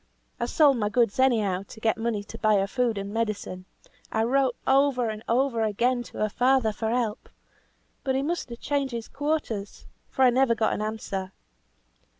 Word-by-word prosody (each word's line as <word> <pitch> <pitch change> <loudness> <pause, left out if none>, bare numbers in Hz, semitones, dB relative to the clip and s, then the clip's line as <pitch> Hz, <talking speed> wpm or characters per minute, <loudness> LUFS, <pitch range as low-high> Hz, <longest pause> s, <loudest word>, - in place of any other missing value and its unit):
I 235 - -1
sold 285 -1 +4
my 210 -2 0
goods 230 0 +1
any 260 -4 +4
how 190 -3 -1
to 200 +3 -12
get 220 0 +1
money 225 -2 -2
to 220 +2 -10
buy 215 -1 +3
her 195 -1 +2
food 235 +1 0
and 200 +1 -5
medicine; 210 -5 -3 0.5
I 220 - +1
wrote 260 +1 +2
over 265 -3 +3
and 215 0 -7
over 240 -1 +2
again 240 +4 +1
to 240 - -11
her 215 - 0
father 250 0 +2
for 220 +1 -2
help, 230 -2 -2 0.7
but 265 -1 0
he 270 - 0
must 340 -2 -2
have 235 0 -8
changed 280 -3 -1
his 230 -1 -4
quarters, 280 -9 -3 0.2
for 265 - +1
I 250 - +6
never 250 -1 +3
got 220 0 +1
an - - -3
answer. 200 -3 -4
230 Hz, 190 wpm, -26 LUFS, 215-260 Hz, 0.7 s, I